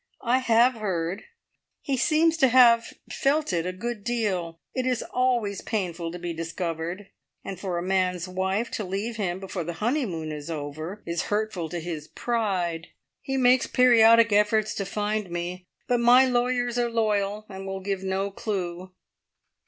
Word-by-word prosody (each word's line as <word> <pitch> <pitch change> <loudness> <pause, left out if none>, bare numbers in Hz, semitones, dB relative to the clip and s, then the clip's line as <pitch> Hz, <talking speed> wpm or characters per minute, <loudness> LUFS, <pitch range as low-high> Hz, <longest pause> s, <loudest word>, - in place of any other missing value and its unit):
I 245 +2 +3
have 240 0 +4
heard. 190 -3 -3 0.5
He 275 - -2
seems 320 +5 +3
to 270 - +5
have 235 -2 +5 0.2
felt 290 -4 +1
it 170 0 0
a - - -1
good 215 +3 -5
deal! 190 -8 -2
It 255 -1 -1
is 250 -2 0
always 240 -6 0
painful 175 -6 -3
to 175 - -6
be 175 -1 -4
discovered, 165 +3 -4 0.3
and 195 -3 -6
for 185 -3 -3
a 170 - -2
man's 185 -1 0
wife 190 +5 -1
to 215 - -3
leave 200 +5 -3
him 185 -3 -2
before 190 -2 -5
the 170 +2 -4
honeymoon 205 - -2
is 150 +1 -7
over 155 +5 -6
is 170 0 -2
hurtful 205 -6 -1
to 175 - -4
his 160 -2 -6
pride. 185 -8 -2 0.3
He 270 0 -3
makes 255 -1 +4
periodic 230 -3 +6
efforts 210 +1 +2
to 195 - -3
find 210 0 -2
me, 175 +1 -5 0.2
but 245 -1 +2
my 245 +2 +6
lawyers 245 -1 0
are 240 -1 +1
loyal, 210 -2 0
and 195 0 -8
will 195 0 -4
give 190 0 -3
no 190 +1 -1
clue." 185 -3 -4
200 Hz, 165 wpm, -26 LUFS, 175-235 Hz, 0.5 s, periodic